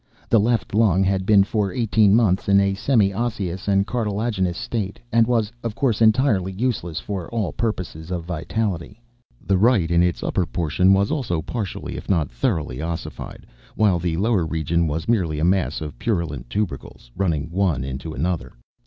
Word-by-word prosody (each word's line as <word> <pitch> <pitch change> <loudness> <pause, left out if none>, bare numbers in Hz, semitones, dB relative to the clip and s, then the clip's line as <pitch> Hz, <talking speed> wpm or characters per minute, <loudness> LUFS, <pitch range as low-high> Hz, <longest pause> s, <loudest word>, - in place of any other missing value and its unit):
The 115 - +5
left 115 -1 0
lung 100 -4 +3
had 95 0 0
been 100 -2 +6
for 100 -1 -1
eighteen 110 -1 +3
months 100 -5 +2
in 100 0 +6
a 100 0 +2
semi 100 -1 +2
osseous 100 -4 -3
or 100 0 +3
cartilaginous 105 -5 -1
state, 100 -1 -3
and 115 -1 +4
was, 115 -3 +1
of 115 -3 -4
course, 120 -5 0
entirely 110 -4 +3
useless 95 -6 -2
for 95 -4 -5
all 110 -7 -2
purposes 90 -8 -3
of 90 -2 -3
vitality. 90 +3 -3 0.5
The 95 -2 +2
right, 105 -7 +3
in 85 0 +4
its 90 -1 0
upper 90 - 0
portion, 90 +3 +1
was 100 +5 +2
also 125 - -1
partially, 105 0 -5
if - - -9
not 80 -9 +1
thoroughly, 60 +2 -2
ossified, 85 0 -6 0.3
while 100 -5 +3
the 85 -1 -1
lower 105 -1 +2
region 80 +1 0
was 80 +4 -3
merely 90 -10 +1
a 75 - +1
mass 95 -1 +1
of 75 -2 -7
purulent 85 - -2
tubercles, 70 - -4
running 85 -4 -1
one 90 -7 +1
into 70 +4 -5
another. 80 -5 -2
95 Hz, 170 wpm, -22 LUFS, 85-110 Hz, 0.5 s, been